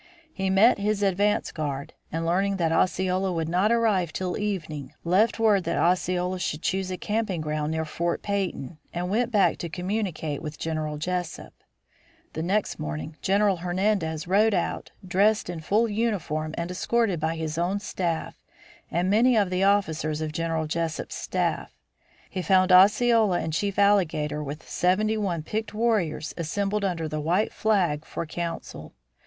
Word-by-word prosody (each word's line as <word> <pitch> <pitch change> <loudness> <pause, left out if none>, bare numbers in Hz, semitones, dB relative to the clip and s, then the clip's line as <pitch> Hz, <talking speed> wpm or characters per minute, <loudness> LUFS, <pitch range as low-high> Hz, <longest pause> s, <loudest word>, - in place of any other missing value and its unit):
He 190 -1 -1
met 200 +4 +5
his 205 0 0
advance 200 +2 +1
guard, 140 -3 -4 0.2
and 165 +1 -2
learning 195 +4 +1
that 165 -3 +1
Osceola 185 +3 +1
would 165 -2 -1
not 185 +6 +2
arrive 210 -8 +2
till 180 +1 -3
evening, 160 -9 -4
left 190 +7 +3
word 215 -4 +3
that - - -1
Osceola 180 +1 +1
should 155 -3 -3
choose 190 0 -1
a 185 - -3
camping 210 -4 -1
ground 150 0 -2
near 160 0 -1
Fort 170 +2 -2
Peyton, 185 -7 -3 0.2
and 180 +2 -2
went 240 +3 +1
back 205 -4 +3
to 170 - -4
communicate 180 -5 -3
with 155 -1 -6
General 155 -2 -3
Jesup. 180 +1 -4 0.8
The 160 - -3
next 195 +5 0
morning 75 - -5
General 200 0 +2
Hernandez 175 -2 -1
rode 205 +3 +3
out - - -2 0.2
dressed 200 +1 +2
in 170 - -6
full 210 +8 +2
uniform 195 -9 -2
and 170 +1 -3
escorted 200 -1 0
by 160 +1 -1
his 160 0 -3
own 185 +4 0
staff 175 -5 -3 0.6
and 175 +2 0
many 230 +5 +4
of 200 -3 +2
the 185 +1 +1
officers 160 -6 +1
of 155 -1 -3
General 165 0 -1
Jesup's 165 +1 -3
staff. - - -2 0.5
He 185 - -4
found 185 0 +3
Osceola 210 +1 +5
and 160 - -3
Chief 200 +3 -1
Alligator 165 -7 +2
with 150 +2 -7
seventy 210 +5 +1
one 185 -7 -2
picked 220 +5 -4
warriors 210 -9 0
assembled 200 +5 -1
under 170 -4 -1
the 155 0 -3
white 180 +8 +1
flag 180 -9 +1
for 165 - -5
council. 170 +1 -6
180 Hz, 160 wpm, -26 LUFS, 160-205 Hz, 0.8 s, met